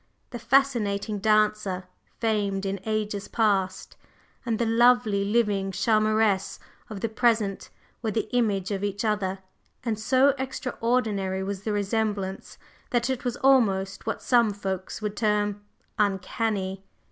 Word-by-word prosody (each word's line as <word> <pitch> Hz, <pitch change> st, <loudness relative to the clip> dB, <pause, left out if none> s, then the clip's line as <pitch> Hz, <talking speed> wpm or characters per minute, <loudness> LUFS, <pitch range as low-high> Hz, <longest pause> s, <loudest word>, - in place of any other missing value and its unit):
The 240 Hz, -, -6 dB
fascinating 220 Hz, -6 st, +1 dB
dancer, 215 Hz, -3 st, +2 dB, 0.4 s
famed 205 Hz, -3 st, 0 dB
in 195 Hz, 0 st, -2 dB
ages 210 Hz, -2 st, -2 dB
past, 195 Hz, -4 st, 0 dB, 0.5 s
and 225 Hz, -2 st, +1 dB
the 235 Hz, -, 0 dB
lovely, 230 Hz, -3 st, +4 dB
living 205 Hz, -2 st, +1 dB
charmeresse 215 Hz, 0 st, +2 dB, 0.3 s
of 205 Hz, -3 st, -7 dB
the -, -, 0 dB
present 220 Hz, -3 st, 0 dB, 0.3 s
were 225 Hz, -, -1 dB
the 220 Hz, +1 st, -1 dB
image 205 Hz, -5 st, +1 dB
of 200 Hz, -1 st, -2 dB
each 205 Hz, +1 st, -2 dB
other, 200 Hz, -3 st, 0 dB, 0.5 s
and 225 Hz, -3 st, -2 dB
so 265 Hz, +5 st, +4 dB
extraordinary 230 Hz, -7 st, -1 dB
was 195 Hz, 0 st, -4 dB
the 215 Hz, -, -3 dB
resemblance 205 Hz, -2 st, -2 dB, 0.3 s
that 240 Hz, 0 st, +1 dB
it 260 Hz, 0 st, -3 dB
was 245 Hz, -2 st, -2 dB
almost 205 Hz, -8 st, +2 dB
what 225 Hz, -, -3 dB
some 235 Hz, -4 st, +3 dB
folks 190 Hz, +1 st, -5 dB
would 210 Hz, -1 st, -2 dB
term 210 Hz, -1 st, 0 dB, 0.4 s
"uncanny." 195 Hz, -1 st, -1 dB
210 Hz, 130 wpm, -26 LUFS, 195-230 Hz, 0.5 s, lovely